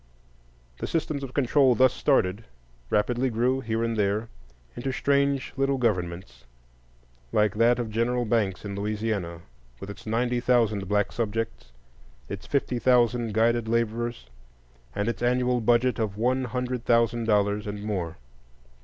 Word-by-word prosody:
The - - -3
systems 155 -3 -2
of 135 -2 -7
control, 135 -1 +4
thus 130 0 +4
started, 110 -7 +1 0.5
rapidly 120 +5 +1
grew, 125 +3 +1
here 115 -1 -1
and 115 0 -1
there, 105 +2 0 0.5
into 135 +2 -3
strange 140 0 +1
little 135 0 +1
governments, 90 - -2 0.9
like 105 -2 +2
that 115 +2 +3
of 120 -3 -3
General 120 +2 0
Banks 105 -4 0
in 100 - -4
Louisiana, 100 -4 -3 0.4
with 100 - -7
its 100 - -12
ninety 120 +2 0
thousand 115 -5 +1
black 105 0 +1
subjects, 115 - -3 0.6
its 100 -1 -7
fifty 130 -3 0
thousand 120 -3 +2
guided 115 0 +2
laborers, 115 - -1 0.7
and 105 +1 -1
its 115 - -2
annual 125 0 +1
budget 120 +1 +2
of 105 -3 -2
one 130 +3 +1
hundred 125 0 -3
thousand 115 -1 +2
dollars 105 -1 +1
and 105 0 -5
more. 90 -6 -3
115 Hz, 140 wpm, -26 LUFS, 105-125 Hz, 0.9 s, control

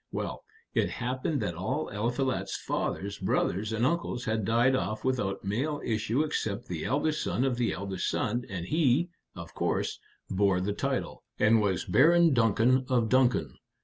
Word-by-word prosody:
Well, - - -4 0.3
it - - +1
happened 130 +3 -2
that 85 - -2
all 120 - -2
Eliphalet's 120 +5 -1
father's 100 +1 -3
brothers 105 +4 0
and 110 +2 +1
uncles 140 -5 -1
had 110 -2 -1
died 120 +5 +3
off 105 -1 -2
without 105 -7 -1
male 135 +10 -1
issue 115 +5 0
except 110 -9 -2
the 85 -3 -4
eldest 150 +3 0
son 125 - 0
of 135 -2 +1
the 120 -2 +1
eldest 95 -1 -3
son, 120 +1 -1
and 90 -3 -4
he, 155 - +2 0.3
of 85 -1 -9
course, - - -1 0.3
bore 95 -1 +2
the 100 +3 -1
title, - - -2 0.2
and 110 +1 +4
was 95 -4 0
Baron 165 +6 +5
Duncan 120 +2 +3
of 120 -3 +2
Duncan. 130 -1 +2
115 Hz, 160 wpm, -29 LUFS, 100-130 Hz, 0.3 s, Baron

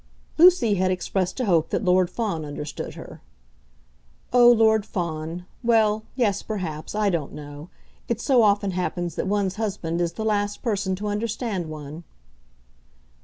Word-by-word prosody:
Lucy 345 - +6
had 185 -1 +1
expressed 185 +2 -2
a 250 - 0
hope 170 -5 +2
that - - -1
Lord 180 -1 +3
Fawn 195 -6 -2
understood 150 0 -6
her. - - -11 1.1
"Oh, 240 -1 +8
Lord 220 -2 +4
Fawn, 170 -3 -4 0.2
well; 220 -2 +2
yes; 210 -6 +1
perhaps; 175 -6 -5
I 210 -2 +2
don't 160 -5 -3
know. 145 +2 -9 0.4
It 235 -1 -1
so 255 -1 +3
often 205 -2 +3
happens 175 -2 -2
that - - -3
one's 200 -1 0
husband 190 -6 -2
is 170 -1 -1
the 220 - -4
last 205 -1 -1
person 200 -5 -1
to 205 +3 -5
understand 210 -4 -2
one." 155 +1 -8
195 Hz, 150 wpm, -24 LUFS, 170-220 Hz, 1.1 s, Oh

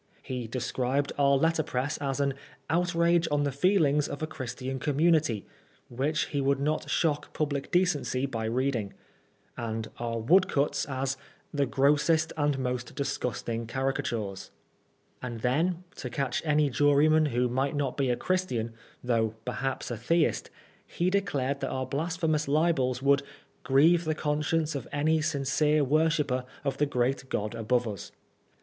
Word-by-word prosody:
He 125 -3 -4
described 130 +3 -1
our 140 0 +5
letterpress 150 -2 0
as 135 -1 -2
an 140 -1 +1 0.4
"outrage 170 0 +2
on 145 0 +1
the 140 - 0
feelings 150 -2 +3
of 145 - -5
a - - +2
Christian 130 -3 -5
community," 150 - +2 0.4
which 140 +5 0
he 145 - -1
would 140 0 +2
not 150 +2 -1
shock 150 -3 0
public 145 -2 -2
decency 175 -7 +1
by 115 -5 -3
reading; 120 -3 -1 0.6
and 110 -1 -4
our 115 -1 -2
woodcuts 140 +3 +2
as 135 -1 -2 0.2
" - - -36
the 140 -2 +1
grossest 150 +4 +2
and 145 -2 +1
most 125 -1 -3
disgusting 115 -4 -3
caricatures." 120 -6 -2 0.7
And 120 -3 -5
then, 165 +9 +1
to 125 - -5
catch 135 +2 -1
any 150 -2 +2
juryman 145 +4 +4
who 125 -2 +1
might 135 +4 -1
not 140 -3 -1
be 135 -2 0
a 120 - +2
Christian, 125 -11 -1 0.3
though 115 -3 +1
perhaps 130 +1 -3
a 120 - -3
Theist, 155 +8 +1 0.3
he 180 +2 -1
declared 140 -9 0
that 135 - -2
our 130 0 -2
blasphe 165 +6 -3
mous 155 -1 +1
libels 140 -4 +1
would 140 0 +4 0.4
"grieve 160 +6 +4
the 155 0 0
conscience 150 +1 0
of 140 - -5
any 155 +2 +2
sincere 150 +1 +1
worshipper 150 -2 +1 0.2
of 140 -2 -2
the 150 - +3
great 130 0 -1
God 105 +2 -2
above 115 +1 0
us." 100 -4 -6
140 Hz, 150 wpm, -28 LUFS, 125-155 Hz, 0.7 s, our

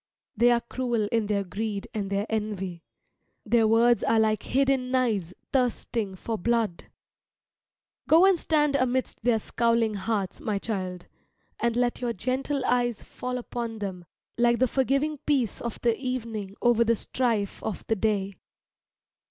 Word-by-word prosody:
They 235 +2 +5
are 240 -1 +3
cruel 235 -3 -1
in 225 -3 +1
their 200 -1 0
greed 200 +2 -4
and 205 -3 -3
their 200 +1 0
envy, 200 -5 -3 0.6
their 225 0 +3
words 230 +2 +4
are 225 - +3
like 215 -1 +2
hidden 270 -1 +1
knives 225 -9 +1 0.2
thirsting 235 -5 0
for 220 +4 -4
blood. 225 -3 0 1.2
Go 330 +4 +7
and 385 -3 +4
stand 295 -3 +2
amidst 255 -3 0
their 240 -1 +3
scowling 230 0 +1
hearts, 200 -2 -2
my 210 -2 -1
child, 185 -4 -4 0.5
and 235 -1 +1
let 245 0 0
your 240 -1 -1
gentle 260 +6 -1
eyes 240 -2 +1
fall 250 0 -5
upon 235 -2 -4
them 190 -4 -5 0.3
like 235 0 +4
the 255 - +3
forgiving 275 +4 0
peace 265 -8 +1
of 235 -2 -4
the 235 -1 +2
evening 230 -6 -4
over 240 -1 +5
the 230 0 +2
strife 225 -3 -1
of 215 - -4
the 225 - +1
day. 200 -2 0
230 Hz, 150 wpm, -27 LUFS, 210-250 Hz, 1.2 s, Go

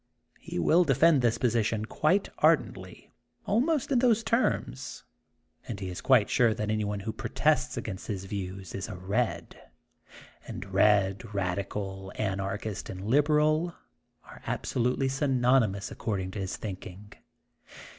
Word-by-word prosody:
He - - -7
will 165 - +4
defend 150 0 +4
this 120 -1 +2
position 115 -3 0
quite 180 - +1
ardently, - - +1 0.4
al 210 - +3
most 295 0 0
in 255 - +4
those 230 -3 +3
terms, 230 +2 -1 0.6
and 110 -5 -5
he 95 -2 -4
is 90 - -6
quite 125 -6 +4
sure 115 -3 +3
that 105 0 -2
anyone 105 -2 -1
who 110 +2 -4
protests - - 0
against 95 - -5
his 95 -3 -4
views 95 -2 -6
is 95 - -4
a 100 - -6
red.^' 100 +7 -2 0.9
And 95 - -6
red,'^ 100 +1 +3
radical,'' 95 +1 -3
anarchist, 100 +1 -3
and 95 +1 -6
liberal* 150 +6 +2 0.2
' - - -46
are - - -14
absolutely 125 +2 0
synonymous, 130 -7 +2
ac - - -10
cording 95 -4 -2
to 105 - -6
his 95 -1 -3
thinking. 100 0 -8
110 Hz, 140 wpm, -28 LUFS, 95-135 Hz, 0.9 s, will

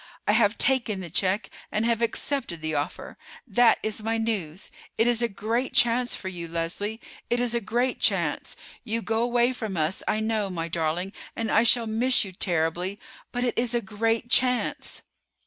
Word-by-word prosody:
I - - +5
have 215 0 +3
taken 240 -6 +2
the 175 -4 -7
check 190 +4 0 0.2
and 215 +2 0
have 235 -1 +1
accepted 235 - -1
the 155 0 -2
offer. 150 +4 -4 0.3
That 235 0 +4
is 215 0 -1
my 225 +1 0
news. 200 -7 -3 0.3
It 225 - +4
is 240 -1 +2
a 235 - +3
great 225 +6 -2
chance 240 +1 +3
for 190 - -7
you, 175 -2 -5
Leslie; 170 +7 -3 0.3
it 240 - +1
is 245 -1 +1
a 235 - 0
great 240 +4 0
chance. - - 0 0.3
You 230 -1 -2
go 225 0 0
away 240 +1 +2
from 220 -7 -4
us, 155 +4 0
I 215 - +1
know, 220 -2 0
my 165 -3 -3
darling, 170 +3 -2 0.2
and 225 -1 -2
I 220 - +5
shall 235 0 +4
miss 230 +2 +3
you 190 - -7
terribly; 175 +2 -1 0.3
but 245 - -2
it 245 - 0
is 240 0 0
a - - +3
great 225 +3 -1
chance." 250 0 +1
220 Hz, 185 wpm, -26 LUFS, 190-235 Hz, 0.3 s, I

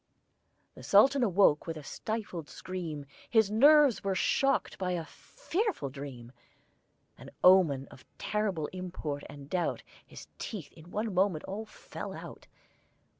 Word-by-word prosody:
The - - -13
Sultan 265 +7 +5
awoke 195 -9 +3
with 165 -1 -4
a 155 - -8
stifled 205 -3 -5
scream: 165 -6 -6 0.2
His 220 -3 +3
nerves 285 +2 +6
were 195 -1 0
shocked 275 +7 +1
by 180 -1 -1
a 170 -2 -3
fearful 365 - -3
dream: 130 -4 -8 0.9
An - - -10
omen 165 -8 +5
of 130 - -14
terrible 205 -7 -1
import 175 -6 -5
and 140 -1 -10
doubt 180 +3 -1 0.2
His - - -12
teeth 200 -9 -6
in 165 +1 -15
one 215 +2 -2
moment 180 -4 +1
all 205 +3 -5
fell - - -8
out. - - -10
185 Hz, 135 wpm, -30 LUFS, 155-215 Hz, 0.9 s, nerves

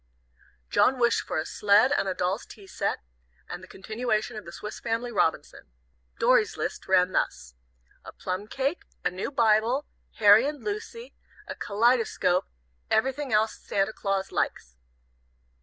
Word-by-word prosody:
John 260 - +3
wished 235 -1 +2
for - - -2
a 155 - -1
sled 210 +9 +4
and 290 - +1
a 190 - -1
doll's 185 +5 -2
tea 205 -4 -13
set, - - -2 0.5
and 175 - -7
the 185 - -12
continuation 215 +3 -2
of 215 - -7
the 170 - -9
Swiss 210 +4 -7
Family 235 +1 -2
Robinson. 165 -7 -1 0.5
Dorry's - - +3
list - - -4
ran 185 -1 +4
thus: - - -2 0.5
"A - - -9
plum 185 +3 -5
cake, 275 +8 -2 0.2
A - - +2
new 185 +1 -4
Bibel, 235 +2 +2 0.3
Harry 215 +4 +6
and 295 -1 -5
Lucy, 445 +3 -6 0.3
A - - -4
Kellidescope, 215 -4 +1 0.4
Everything 265 +5 0
else 215 +1 +2
Santa 195 +2 -1
Claus 195 -2 -2
likes." 60 0 -2
215 Hz, 145 wpm, -27 LUFS, 190-250 Hz, 0.5 s, Harry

